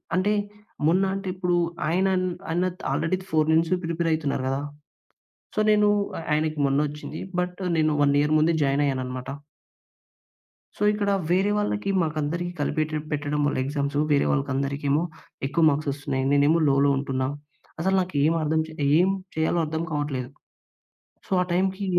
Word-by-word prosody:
అంటే 200 +3 +2 0.5
మొన్న 185 +4 +3
అంటే 195 0 -5
ఇప్పుడు 180 -1 0 0.3
ఆయన 185 +4 +2 0.2
న్ - - 0 0.2
అన్న 175 +2 +1
త్ - - -12
ఆల్రెడీ 165 +6 0
4 155 -2 +2
నుంచి 165 +3 +2
ప్రిపేర్ 165 0 -1
అయితున్నారు 145 -4 -1
కదా! 135 +1 -1 0.9
సో, - - 0
నేను 210 0 +4 0.3
అ - - -6
ఆయనకి 155 0 0
మొన్న 135 +1 +1
వచ్చింది. 150 +1 -7 0.2
బట్ 180 +1 -3 0.2
నేను 155 -1 +3
1 140 0 +3
ఇయర్ 150 +1 +2
ముందే 165 +2 +3
జాయిన్ 140 +1 +2
అయ్యాను 130 -2 -1
అన్నమాట. 125 0 -6 1.5
సో, 210 - -2
ఇక్కడ 205 -1 -1 0.2
వేరే 190 +3 +3
వాళ్ళకి 205 -1 -1
మాకందరికీ 155 +3 -2
కలిపెట్టి 155 +1 -1
పెట్టడం 145 0 -1
వల్ల 145 - -1
ఎగ్జామ్సు 140 +1 -1
వేరే 140 - +3
వాళ్ళకి 140 -1 0
అందరికేమో 140 +3 0 0.4
ఎక్కువ 165 +3 +1
మార్క్స్ 145 0 -1
వస్తున్నాయి. 140 -2 -3
నేనేమో 145 +4 +4
లోలో 140 +1 +3
ఉంటున్నా. 130 -1 -1 0.5
అసలు 190 +2 +2
నాకు 150 -6 -1 0.2
అర్థం 160 +1 +1
చే - - -11 0.3
ఏమి 190 +2 +3 0.2
చేయాలో 160 +2 +1
అర్థం 160 +2 -3
కావట్లేదు. 140 -4 -2 1.0
సో, - - -22
ఆ - - -7
టైమ్‌కి 190 +2 0
155 Hz, 155 wpm, -25 LUFS, 145-180 Hz, 1.5 s, నేను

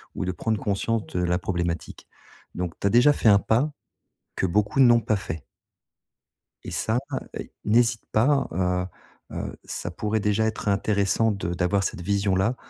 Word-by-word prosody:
ou - - -2
de 90 - -1
prendre 110 +4 -1
conscience 105 +2 -1
de 90 - -3
la 90 0 +1
problématique. 85 -3 -3 0.5
Donc, 90 -1 -3
tu 100 - +1
as - - +1
déjà 125 +5 +6
fait 120 - 0
un 100 -1 +7
pas 125 +9 +1 0.6
que - - 0
beaucoup 105 +8 +1
n'ont 120 -3 +6
pas 110 -2 +1
fait. 80 -6 -6 1.2
Et - - -7
ça 110 +3 0 0.4
et - - -8
n'hésite 115 +1 +3
pas, 135 +6 +3
heu 90 +1 0 0.5
heu, - - -4
ça - - -5
pourrait 105 +5 -1
déjà 105 +1 +1
être 110 -1 -3
intéressant 100 +2 +2
de 95 -4 -3
d'avoir 90 +3 +1
cette 90 - -3
vision 100 +1 +1
là, 100 +7 +1
100 Hz, 170 wpm, -25 LUFS, 90-115 Hz, 1.2 s, un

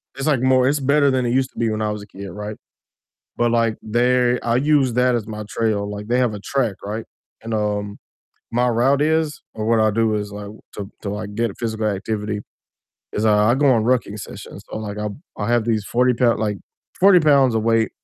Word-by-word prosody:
it's, 135 - -3
like, 140 -5 +2
more 130 -1 +4
it's 145 +2 +1
better 140 +1 +3
than 130 -1 0
it 120 - 0
used 130 +1 +1
to - - -25
be 115 -1 +1
when 110 0 -2
I 105 -1 0
was 105 0 -5
a - - -14
kid, 100 -1 -9
right, 105 +3 -6 0.8
but, 120 0 +2
like, 115 -2 +2
they 125 +2 +2
I 115 0 0
use 140 -1 +3
that 125 0 +3
as 115 -3 -2
my 105 -1 -6
trail, 105 -3 -1
like, 105 +1 -7
they 120 +1 +2
have 125 -4 +1
a 105 - -7
track, 120 -2 -1
right, 110 +3 -4 0.4
and, 115 0 -4
um, 105 -1 -2 0.5
my 120 +1 +2
route 125 +4 +2
is 160 0 0
or 110 - -4
what 115 0 +3
I 110 0 +4
do 110 0 +1
is, 105 -1 -4
like 100 0 -7 0.2
to 100 -1 -6
to, 100 - -4
like, 105 0 -5
get 115 -3 -1
physical 110 -2 -2
activity, 105 +1 -2 0.7
is 105 - -1
I 105 +1 +4
I - - +3
go 145 +1 +2
on 115 -4 +3
rucking 120 -4 0
sessions, - - -10
so, - - -4
like, 105 -1 -5
I'll 105 -1 -4 0.2
I'll 105 - -3
have 120 -1 +2
these 110 -3 0
40 125 +3 +2
pou 120 0 +3
like 105 -2 -1 0.4
40 195 -1 +7
pounds 140 -5 +4
of 110 - 0
weight 115 -1 +2
115 Hz, 225 wpm, -21 LUFS, 105-125 Hz, 0.8 s, 40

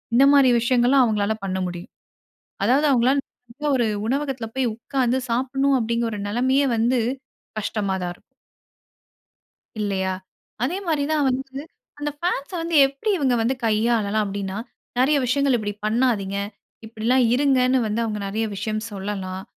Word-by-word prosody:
இந்த 265 +3 +7
மாரி 275 -3 +6
விஷயங்கள்ல்லாம் 250 +2 +4
அவங்களால 215 -1 0
பண்ண 190 -1 -2
முடியும். 175 0 -8 0.7
அதாவது 270 +7 +3
அவங்களால, 255 +3 +3 0.3
"நல்ல 295 +4 -2
ஒரு 235 - +2 0.2
உணவகத்தில் 265 -4 -2
போய் 250 -4 +1
உட்கார்ந்து 255 +1 0
சாப்பிடணும்." 270 +3 +1
அப்படீங்கிற 235 +1 0
ஒரு 210 - -4
நெலைமையே 260 +5 +2
வந்து 240 +3 +2 0.6
கஷ்டமா 200 -2 -2
தான் 175 0 -2
இருக்கும். - - -33 1.5
இல்லையா! 190 -2 -1 0.5
அதே 345 +9 0
மாரிதான் 300 -2 +1
வந்து, 265 +1 -3 0.4
அந்த 295 0 -2
ஃபேன்ஸ 340 -3 -2
வந்து 335 0 -2
எப்டி 275 +10 -4
இவுங்க 265 -5 +2
வந்து 255 +4 +1
கையாளலாம் 215 -1 +1
அப்டின்னா, 195 -1 -4 0.4
நெறைய 285 +3 +4
விஷயங்கள் 275 0 +2
இப்டி 205 -2 -3
பண்ணாதீங்க. 215 -4 +1 0.5
இப்பிடிலாம் 230 +3 +1
இருங்கன்னு 260 -2 +3
வந்து 215 +2 -1
அவுங்க 215 -2 -3
நெறைய 220 +3 -1
விஷயம் 215 +2 -3
சொல்லலாம். 190 -1 -5
240 Hz, 135 wpm, -23 LUFS, 210-270 Hz, 1.5 s, இந்த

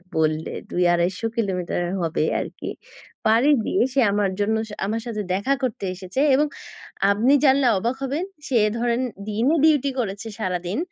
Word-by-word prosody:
বললে 155 0 0 0.2
২-২৫০ 175 +3 +1
কিলোমিটার 180 -5 -1 0.2
হবে 165 -2 0 0.2
আরকি, - - -6 0.6
পাড়ি 230 +6 +4 0.2
দিয়ে - - +1
সে 275 - +2
আমার 205 -1 +1
জন্য, 215 +2 +1 0.3
আমার 225 +3 -2
সাথে 215 -3 -3
দেখা 205 +9 +1
করতে 225 -5 -2
এসেছে। 185 +7 -5 0.2
এবং 295 +2 +3 0.6
আপনি 225 +7 +3
জানলে 270 -1 +4
অবাক 235 +6 -1
হবেন, 280 +6 -1 0.2
সে 265 - -1 0.2
ধরেন 235 +1 0 0.3
দিনে 230 +9 +1
ডিউটি 295 -3 +4
করেছে 210 0 -3
সারাদিন। 180 -1 -2
215 Hz, 145 wpm, -23 LUFS, 185-255 Hz, 0.6 s, পাড়ি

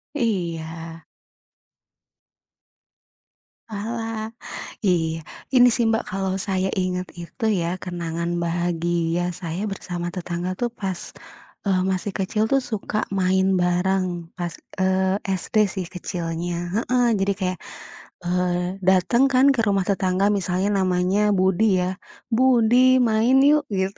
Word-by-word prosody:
Iya. 165 - -3 2.7
Walah, 220 +1 -4 0.6
iya. 165 -4 +1 0.2
Ini 250 -2 +6
sih, 230 -2 +2
Mbak, 225 0 +1
kalau 190 0 -1
saya 190 -1 -1
ingat 180 0 -2
itu 170 +6 -6
ya 180 -3 -1
kenangan 170 -1 -3
bahagia 170 0 -1
saya 175 +2 -4
bersama 175 -3 -4
tetangga 180 0 -3
tuh 240 +6 -2
pas, 195 -6 -5 0.6
eee, 190 -2 +2
masih 190 +2 -2
kecil 210 +3 0
tuh 275 -1 +4
suka 215 -2 -3
main 190 0 +2
barang 185 +2 +1 0.3
pas, 175 -2 -3 0.2
eee, 190 0 +2 0.2
SD - - -10
sih 190 -2 -4
kecilnya, 175 -1 -4 0.2
heeh, 245 +1 +2
jadi 195 +1 +1
kayak, 185 0 -1 0.7
eee, 180 +1 0
dateng 190 +7 +4
kan 255 +2 +5
ke 235 - +2
rumah 195 -1 +2
tetangga 190 -1 +1
misalnya 185 +1 0 0.2
namanya 180 +2 +1 0.2
Budi 190 +3 +3 0.2
ya, 185 +1 -2 0.4
"Budi 255 +1 +5
main 225 +4 +3
yuk," 300 0 +4
gitu, 190 +1 -1
185 Hz, 120 wpm, -23 LUFS, 175-210 Hz, 2.7 s, Ini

